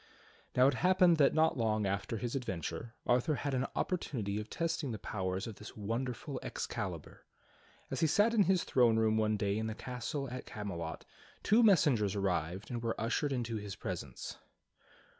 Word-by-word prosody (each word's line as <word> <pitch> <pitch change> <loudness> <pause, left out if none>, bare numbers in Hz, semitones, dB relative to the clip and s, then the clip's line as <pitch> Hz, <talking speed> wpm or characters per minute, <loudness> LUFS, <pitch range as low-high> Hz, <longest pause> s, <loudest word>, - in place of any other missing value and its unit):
Now 125 - +6
it 140 - +5
happened 180 +3 +4
that 145 -1 +4
not 160 -4 +3
long 110 -2 +1
after 100 +3 -1
his 120 +4 -3
adventure 95 - -4
Arthur 125 +5 +2
had 140 0 -2
an 130 +1 0
opportunity 110 - -1
of 105 0 -7
testing 165 -4 -1
the 110 - -3
powers 95 -2 -3
of 110 -3 -7
this 105 - -10
wonderful 125 +6 -3
Excalibur. - - -5 0.7
As - - -2
he 160 - +4
sat 205 +9 +4
in 210 -4 +5
his 185 -2 +3
throne 120 -3 +4
room 110 -1 +3
one 110 -1 +2
day 100 +1 0
in 110 - -2
his 110 0 -4
castle 125 +3 -4
at 125 - -6
Camelot 85 -6 -5 0.4
two 220 +4 +5
messengers 145 - +4
arrived 95 - -1
and 120 -1 -3
were 115 -1 -2
ushered 115 +6 0
into 120 -3 -1
his 100 -2 -6
presence. 65 -3 -6
115 Hz, 175 wpm, -33 LUFS, 105-140 Hz, 0.7 s, Now